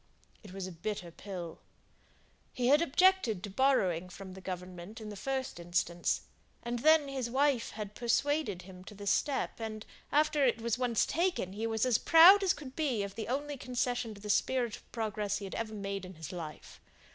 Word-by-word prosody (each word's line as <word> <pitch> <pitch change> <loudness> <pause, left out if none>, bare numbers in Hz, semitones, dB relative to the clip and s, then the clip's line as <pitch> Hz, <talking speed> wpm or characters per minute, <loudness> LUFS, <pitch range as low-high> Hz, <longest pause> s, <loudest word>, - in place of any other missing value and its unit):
It 205 - -12
was 190 0 -5
a 185 - -6
bitter 175 +1 -5
pill. 175 -3 -7 0.9
He 250 0 +1
had 295 +3 +6
objected 335 - +3
to 205 - -5
borrowing 190 -8 +2
from 190 0 -9
Government, 185 +2 -7
in 215 -1 -7
the 205 - -7
first 265 0 -3
instance; 175 0 0 0.4
and 240 0 -2
then 310 +2 +5
his 265 -3 -3
wife 270 -1 +2
had 210 -2 -6
persuaded 240 - 0
him 185 0 -12
to 210 - -10
the 205 0 -9
step; 275 +6 0
and 220 -1 -5 0.3
after 300 0 +3
it 240 -3 +3
was 230 -1 0
once 245 -3 +2
taken, 340 - 0
he 220 +3 -2
was 225 +1 +1
as 250 -4 +3
proud 350 +5 +8
as 385 -2 +3
could 270 -6 -6
be 265 -10 0
of 200 -1 -5
the 220 +2 -5
only 285 +3 -2
concession 245 -3 -2
to 200 - -13
the 210 0 -1
spirit 240 -1 +1
of - - -18
progress 210 -3 -2
he 200 - -6
ever 220 -1 -4
made 195 -1 -4
in 185 0 -9
his 160 -1 -7
life. 160 -5 -8
220 Hz, 190 wpm, -32 LUFS, 195-265 Hz, 0.9 s, proud